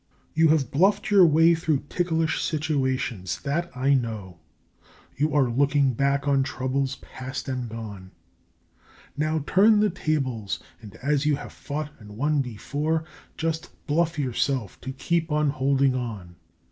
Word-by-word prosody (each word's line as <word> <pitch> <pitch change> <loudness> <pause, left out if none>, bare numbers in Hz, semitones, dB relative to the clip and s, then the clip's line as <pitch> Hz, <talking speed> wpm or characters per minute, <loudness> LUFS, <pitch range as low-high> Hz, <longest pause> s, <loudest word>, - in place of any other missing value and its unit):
You 160 +1 +4
have 155 -3 +2
bluffed 195 +8 +2
your 195 -4 +8
way 165 +2 +5
through 160 -4 0
ticklish 165 -1 0
situations; 130 - -1
that 155 +5 -1
I 135 +2 +3
know. 110 -9 -2 0.8
You 150 +2 +1
are 135 -3 +4
looking 140 +2 +2
back 140 +3 +1
on 140 -1 +3
troubles 135 0 -1
past 130 +2 -7
and 125 -3 -3
gone; 105 -4 -8 1.1
Now, 155 0 0
turn 210 +5 +5
the 210 -1 +3
tables, 135 - -1 0.2
and 105 -1 -12
as 145 +1 +1
you 150 - +3
have - - -9
fought 150 +1 -5
and 105 -1 -12
won 145 +2 +2
before, 145 +7 -2 0.3
Just 165 +1 -2 0.2
BLUFF 165 +1 +1
YOURSELF 130 -4 -1
to 130 - -5
keep 165 +4 -1
on 150 -1 +2
holding 135 -1 +2
on! 105 -9 -5
140 Hz, 145 wpm, -25 LUFS, 130-155 Hz, 1.1 s, your